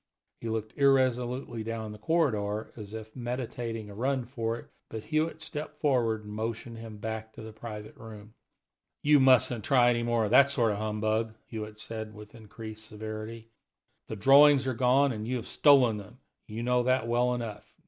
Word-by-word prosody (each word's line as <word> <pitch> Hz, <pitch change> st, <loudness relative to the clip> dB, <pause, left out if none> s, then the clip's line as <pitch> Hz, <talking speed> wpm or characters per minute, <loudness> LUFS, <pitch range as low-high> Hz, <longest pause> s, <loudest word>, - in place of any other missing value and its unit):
He 115 Hz, -, -5 dB
looked 110 Hz, -1 st, -4 dB
irresolutely 125 Hz, -3 st, +2 dB
down 110 Hz, -1 st, -4 dB
the 105 Hz, -, -10 dB
corridor, 110 Hz, -8 st, 0 dB
as 105 Hz, -3 st, -9 dB
if 110 Hz, 0 st, -9 dB
meditating 120 Hz, -3 st, -4 dB
a 100 Hz, -, -10 dB
run 130 Hz, +3 st, -1 dB
for 115 Hz, -2 st, -3 dB
it, -, -, -11 dB, 0.2 s
but 110 Hz, -1 st, -6 dB
Hewitt 155 Hz, 0 st, -1 dB
stepped 150 Hz, -1 st, -6 dB
toward 120 Hz, -7 st, +1 dB
him -, -, -16 dB
and -, -, -7 dB
motioned 115 Hz, +1 st, -4 dB
him 110 Hz, -2 st, -9 dB
back 110 Hz, +1 st, -5 dB
to -, -, -10 dB
the 110 Hz, 0 st, -9 dB
private 110 Hz, -1 st, -8 dB
room. 110 Hz, -1 st, -12 dB, 0.7 s
"You 150 Hz, 0 st, +6 dB
mustn't 130 Hz, -4 st, +4 dB
try 120 Hz, -1 st, +4 dB
any 120 Hz, -1 st, 0 dB
more 120 Hz, -1 st, +1 dB
of 105 Hz, -, -3 dB
that 140 Hz, +3 st, +7 dB
sort 120 Hz, -6 st, +2 dB
of 100 Hz, -, -3 dB
humbug," 110 Hz, +1 st, -1 dB
Hewitt 105 Hz, -1 st, -7 dB
said 110 Hz, -1 st, -6 dB
with 105 Hz, 0 st, -12 dB
increased 110 Hz, -1 st, -9 dB
severity. 110 Hz, +1 st, -7 dB, 0.6 s
"The 110 Hz, -, -5 dB
drawings 135 Hz, +5 st, +6 dB
are 130 Hz, -, 0 dB
gone, 130 Hz, +3 st, +3 dB
and 110 Hz, -2 st, -5 dB
you 130 Hz, -, -1 dB
have 120 Hz, -, -4 dB
stolen 130 Hz, -7 st, +5 dB
them; 105 Hz, +4 st, -11 dB, 0.3 s
you 110 Hz, +2 st, -5 dB
know 125 Hz, 0 st, +2 dB
that 130 Hz, -1 st, +1 dB
well 120 Hz, +1 st, +2 dB
enough. 115 Hz, -4 st, -6 dB
115 Hz, 185 wpm, -29 LUFS, 110-125 Hz, 0.7 s, that